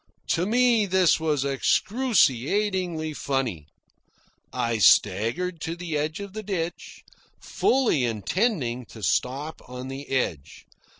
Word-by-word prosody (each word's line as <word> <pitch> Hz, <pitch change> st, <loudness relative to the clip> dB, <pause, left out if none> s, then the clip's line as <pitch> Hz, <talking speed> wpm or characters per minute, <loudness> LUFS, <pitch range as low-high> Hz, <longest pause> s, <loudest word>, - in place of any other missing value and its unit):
To 175 Hz, +3 st, +1 dB
me 235 Hz, -2 st, +3 dB
this 185 Hz, -3 st, +3 dB
was 150 Hz, -4 st, 0 dB
excruciatingly 180 Hz, -, +1 dB
funny. 130 Hz, -, -2 dB, 0.8 s
I 115 Hz, -1 st, -1 dB
staggered 115 Hz, -, +3 dB
to 165 Hz, +2 st, -3 dB
the 170 Hz, -3 st, -5 dB
edge 150 Hz, +3 st, -2 dB
of 200 Hz, -1 st, -8 dB
the 215 Hz, -, -5 dB
ditch, 175 Hz, -5 st, -5 dB, 0.4 s
fully 245 Hz, -, +1 dB
intending 125 Hz, -, -1 dB
to 110 Hz, -, -12 dB
stop 140 Hz, +9 st, -1 dB
on 125 Hz, +1 st, -7 dB
the 135 Hz, +2 st, -8 dB
edge. 80 Hz, -, -3 dB
155 Hz, 115 wpm, -25 LUFS, 125-190 Hz, 0.8 s, me